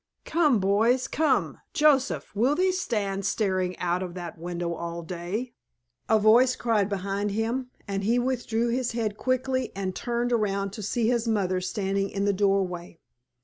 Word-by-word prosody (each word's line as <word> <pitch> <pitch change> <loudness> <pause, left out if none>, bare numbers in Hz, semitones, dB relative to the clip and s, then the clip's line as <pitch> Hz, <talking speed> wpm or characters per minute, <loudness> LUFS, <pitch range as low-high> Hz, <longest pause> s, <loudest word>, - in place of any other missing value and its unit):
"Come, 300 -8 +3
boys—come, 245 +9 +2
Joseph, 285 -6 +2
will 250 +8 +3
thee 370 +2 +2
stand 205 - -2
staring 185 -3 0
out 180 +1 0
of 180 -1 -5
that 175 -2 -6
window 170 0 -4
all 170 0 -5
day?" 180 +8 -4 0.6
a 220 - +5
voice 235 +4 +5
cried 215 -4 +1
behind 200 +1 -2
him, 230 +5 -2 0.2
and 195 0 -2
he 230 +4 +2
withdrew 240 -2 0
his 245 0 -1
head 220 -3 -1
quickly 255 +2 -1
and 190 -2 -3
turned 240 0 -1
around 200 -3 0
to 215 - -7
see 220 +3 0
his 235 -1 +1
mother 190 -4 +1
standing 195 +1 -1
in 200 0 -2
the 205 - +2
doorway. 190 -4 0
210 Hz, 155 wpm, -26 LUFS, 190-245 Hz, 0.6 s, a